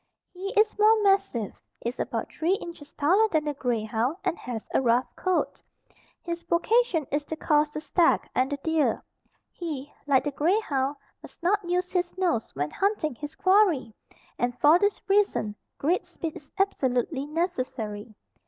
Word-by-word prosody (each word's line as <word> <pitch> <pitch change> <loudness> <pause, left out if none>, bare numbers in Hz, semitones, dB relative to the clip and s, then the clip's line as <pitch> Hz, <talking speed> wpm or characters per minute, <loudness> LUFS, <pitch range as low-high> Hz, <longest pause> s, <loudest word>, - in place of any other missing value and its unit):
He 385 +2 -5
is 430 0 +2
more 430 0 +5
massive, 390 - +1 0.2
is 240 +2 -3
about - - -3
three 345 +4 +1
inches 335 -6 -9
taller 370 +10 +3
than 315 -5 +1
the 295 - -1
grey 245 -5 -1
hound 230 +8 -1
and - - 0
has 235 -3 -6
a - - +3
rough 245 0 +3
coat. 370 -1 -1 0.6
His 340 0 -4
vocation 355 - +2
is 290 +1 0
to 320 - -4
course 300 -1 +2
the 305 - -4
stag 335 +1 +2
and 260 +2 +1
the 285 - -1
deer. 320 -2 +1 0.5
He, 295 -5 -6
like 270 -2 +4
the 290 - -2
grey 335 +9 +2
hound 275 -7 -1 0.3
must - - -15
not 380 0 +1
use 360 +1 0
his 355 -1 -1
nose 340 -12 0
when 145 +2 -2
hunting 390 - 0
his 295 +4 -8
quarry 370 - +3 0.5
and 245 0 -1
for 310 +4 +6
this 405 +1 +1
reason 390 - +2 0.2
great 345 +6 +1
speed 345 -3 -6
is 285 - -12
absolutely 275 - 0
necessary. 255 - -3
315 Hz, 165 wpm, -27 LUFS, 260-370 Hz, 0.6 s, for